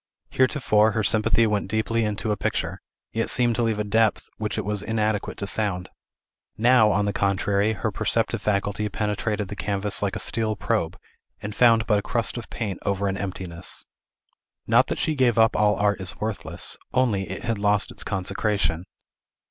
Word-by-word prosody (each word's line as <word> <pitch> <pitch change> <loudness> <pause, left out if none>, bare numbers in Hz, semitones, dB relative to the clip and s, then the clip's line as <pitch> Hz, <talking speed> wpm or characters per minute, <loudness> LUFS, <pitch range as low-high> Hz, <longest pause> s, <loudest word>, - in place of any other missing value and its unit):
Heretofore, 120 -5 +3
her 110 - 0
sympathy 110 +2 +3
went 105 -3 0
deeply 110 +1 0
into 105 +1 -2
a - - +1
picture, - - -3 0.3
yet 115 0 -1
seemed 120 -2 +2
to - - +1
leave 115 -2 +1
a 105 - -1
depth 110 +1 +1
which 110 0 -3
it 110 - -2
was 105 -1 0
inadequate 110 -1 -1
to 100 - -4
sound; 100 -4 -1 0.7
now, 115 -1 +5
on 100 +1 +1
the 100 - -1
contrary, 100 +2 +1
her 105 - -2
perceptive - - 0
faculty 105 0 -1
penetrated 105 0 -2
the 105 - -7
canvas 100 0 -1
like 100 0 -1
a - - -3
steel 110 -1 0
probe, 105 -6 -1 0.5
and 105 +1 -4
found 115 -2 +5
but 105 -2 +2
a - - -4
crust 115 +2 0
of 120 -2 -7
paint 100 -5 -4
over 100 0 -1
an 95 - -1
emptiness. 95 -3 -4 0.8
Not - - +4
that - - -3
she 155 - 0
gave 130 -5 +2
up 110 0 +4
all 105 0 +3
art 100 0 +1
as 95 - +3
worthless; 110 -2 -3 0.2
only 110 -7 +1
it 95 - -6
had 115 -3 -2
lost 105 0 +2
its - - -4
consecration. 95 -3 -1
105 Hz, 180 wpm, -24 LUFS, 100-110 Hz, 0.8 s, now